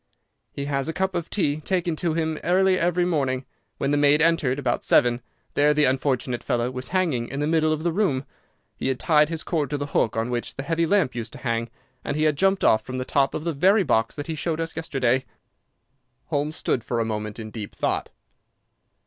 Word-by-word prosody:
"He 140 Hz, -, -5 dB
has 140 Hz, -1 st, -1 dB
a -, -, -2 dB
cup 190 Hz, +2 st, -1 dB
of 175 Hz, -2 st, -3 dB
tea 150 Hz, -8 st, 0 dB
taken 180 Hz, 0 st, 0 dB
in -, -, -2 dB
to 170 Hz, -1 st, 0 dB
him 160 Hz, -1 st, -1 dB
early 185 Hz, +2 st, +3 dB
every 175 Hz, +1 st, +2 dB
morning. 135 Hz, -6 st, 0 dB, 0.3 s
When 140 Hz, -, -1 dB
the 145 Hz, -, +2 dB
maid 145 Hz, +1 st, +4 dB
entered, 160 Hz, -5 st, +3 dB
about 125 Hz, -4 st, -1 dB
seven, 120 Hz, 0 st, +3 dB, 0.3 s
there 150 Hz, +1 st, +3 dB
the 150 Hz, -, +3 dB
unfortunate 130 Hz, -2 st, 0 dB
fellow 120 Hz, +1 st, 0 dB
was 125 Hz, 0 st, -5 dB
hanging 165 Hz, -11 st, 0 dB
in 135 Hz, -, -5 dB
the 145 Hz, -, 0 dB
middle 155 Hz, 0 st, +2 dB
of 155 Hz, 0 st, -1 dB
the 170 Hz, -, +1 dB
room. 160 Hz, -8 st, 0 dB, 0.5 s
He -, -, -3 dB
had 130 Hz, -1 st, -1 dB
tied 150 Hz, -2 st, +4 dB
his 165 Hz, -1 st, -4 dB
cord 150 Hz, -6 st, -1 dB
to 145 Hz, -, -1 dB
the 145 Hz, -, -3 dB
hook 115 Hz, -6 st, 0 dB
on 115 Hz, +2 st, -1 dB
which 120 Hz, -1 st, -3 dB
the 135 Hz, -, -5 dB
heavy 165 Hz, +2 st, 0 dB
lamp 190 Hz, -8 st, +2 dB
used 115 Hz, -2 st, -5 dB
to -, -, -8 dB
hang, 115 Hz, 0 st, -1 dB, 0.3 s
and -, -, -2 dB
he 155 Hz, -, +1 dB
had 155 Hz, -1 st, +3 dB
jumped 195 Hz, +5 st, +2 dB
off 110 Hz, -, +5 dB
from 130 Hz, +2 st, -6 dB
the 130 Hz, -, -3 dB
top 135 Hz, 0 st, +1 dB
of 155 Hz, -, -3 dB
the 170 Hz, -1 st, -1 dB
very 190 Hz, +8 st, +4 dB
box 115 Hz, -8 st, +1 dB
that 145 Hz, -1 st, -5 dB
he 165 Hz, -, -3 dB
showed 160 Hz, +1 st, -2 dB
us 165 Hz, 0 st, -3 dB
yesterday." 130 Hz, -5 st, 0 dB, 1.1 s
Holmes 150 Hz, 0 st, -1 dB
stood 120 Hz, -, -1 dB
for 120 Hz, -, -2 dB
a 115 Hz, -, +1 dB
moment 105 Hz, -1 st, -4 dB
in 110 Hz, -2 st, -7 dB
deep 105 Hz, -3 st, -7 dB
thought. -, -, -1 dB
145 Hz, 225 wpm, -24 LUFS, 130-165 Hz, 1.1 s, off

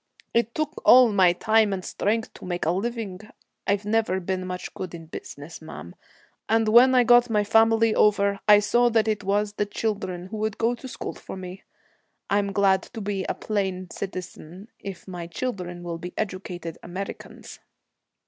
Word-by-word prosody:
It 235 Hz, 0 st, +1 dB
took 310 Hz, -1 st, -1 dB
me -, -, -29 dB
all 250 Hz, -2 st, +7 dB
my 185 Hz, -3 st, +5 dB
time 220 Hz, +3 st, +2 dB
and 185 Hz, -2 st, -3 dB
strength 220 Hz, +2 st, -1 dB
to -, -, -11 dB
make 175 Hz, -2 st, -3 dB
a 160 Hz, -, +2 dB
living 205 Hz, -1 st, -3 dB, 0.5 s
I've 200 Hz, +1 st, +1 dB
never 210 Hz, -3 st, +1 dB
been 185 Hz, 0 st, -3 dB
much 180 Hz, 0 st, -6 dB
good 185 Hz, -2 st, -6 dB
in 165 Hz, -1 st, -10 dB
business, 155 Hz, 0 st, -9 dB
ma'am 90 Hz, -, -9 dB, 0.6 s
and 225 Hz, 0 st, +3 dB
when 250 Hz, +4 st, +7 dB
I 250 Hz, -, +6 dB
got 240 Hz, 0 st, +5 dB
my 210 Hz, -2 st, +2 dB
family 225 Hz, +1 st, +4 dB
over, 200 Hz, -2 st, +3 dB
I 210 Hz, -1 st, +8 dB
saw 240 Hz, +4 st, +3 dB
that 225 Hz, -2 st, +2 dB
it 215 Hz, -1 st, -1 dB
was 205 Hz, +1 st, 0 dB
the 205 Hz, 0 st, -1 dB
children 200 Hz, -4 st, -3 dB
would 215 Hz, -1 st, -2 dB
go 230 Hz, +1 st, +1 dB
to 245 Hz, +2 st, -8 dB
school -, -, -6 dB
for -, -, -9 dB
me. 185 Hz, 0 st, -9 dB, 0.7 s
I'm 200 Hz, 0 st, +2 dB
glad 195 Hz, -1 st, +3 dB
to -, -, -4 dB
be 200 Hz, -2 st, -3 dB
a -, -, -1 dB
plain 190 Hz, -4 st, -3 dB
citizen, 185 Hz, 0 st, -7 dB
if 195 Hz, -1 st, -8 dB
my 175 Hz, -2 st, -6 dB
children 175 Hz, -3 st, -5 dB
will 170 Hz, -1 st, -5 dB
be 180 Hz, +2 st, -8 dB
educated 180 Hz, -4 st, -5 dB
Americans.' 190 Hz, +3 st, -8 dB
200 Hz, 175 wpm, -25 LUFS, 185-225 Hz, 0.7 s, I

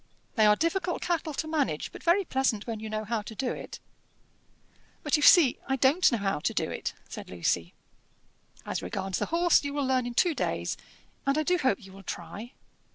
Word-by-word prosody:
They 215 Hz, -4 st, +4 dB
are 210 Hz, -, +6 dB
difficult 345 Hz, -, -1 dB
cattle 325 Hz, -3 st, -1 dB
to 315 Hz, -, -3 dB
manage, 285 Hz, -, -1 dB
but -, -, -10 dB
very 360 Hz, +3 st, +3 dB
pleasant 265 Hz, -8 st, 0 dB
when 225 Hz, -2 st, -4 dB
you 220 Hz, 0 st, -6 dB
know 215 Hz, 0 st, -2 dB
how 220 Hz, 0 st, -2 dB
to 220 Hz, +2 st, -9 dB
do 255 Hz, +2 st, -1 dB
it." -, -, -7 dB, 1.2 s
"But 300 Hz, -, +2 dB
you 300 Hz, -, +1 dB
see 295 Hz, -5 st, +7 dB
I 270 Hz, -, +1 dB
don't 275 Hz, +7 st, +4 dB
know 235 Hz, -, +1 dB
how 195 Hz, -5 st, -1 dB
to -, -, -2 dB
do -, -, 0 dB
it," -, -, -4 dB
said -, -, -8 dB
Lucy. 85 Hz, -1 st, -1 dB, 0.9 s
"As -, -, -3 dB
regards 190 Hz, -, -3 dB
the -, -, -1 dB
horse, 340 Hz, 0 st, +3 dB
you 285 Hz, 0 st, -4 dB
will 285 Hz, -2 st, 0 dB
learn 255 Hz, -2 st, +1 dB
in 240 Hz, -, -6 dB
two 345 Hz, +6 st, +3 dB
days, -, -, -2 dB, 0.5 s
and 275 Hz, +2 st, +3 dB
I 310 Hz, -, +2 dB
do 360 Hz, +3 st, +2 dB
hope 260 Hz, -, 0 dB
you 190 Hz, -, -13 dB
will 195 Hz, +1 st, -12 dB
try. 220 Hz, +5 st, -7 dB
260 Hz, 210 wpm, -28 LUFS, 210-315 Hz, 1.2 s, see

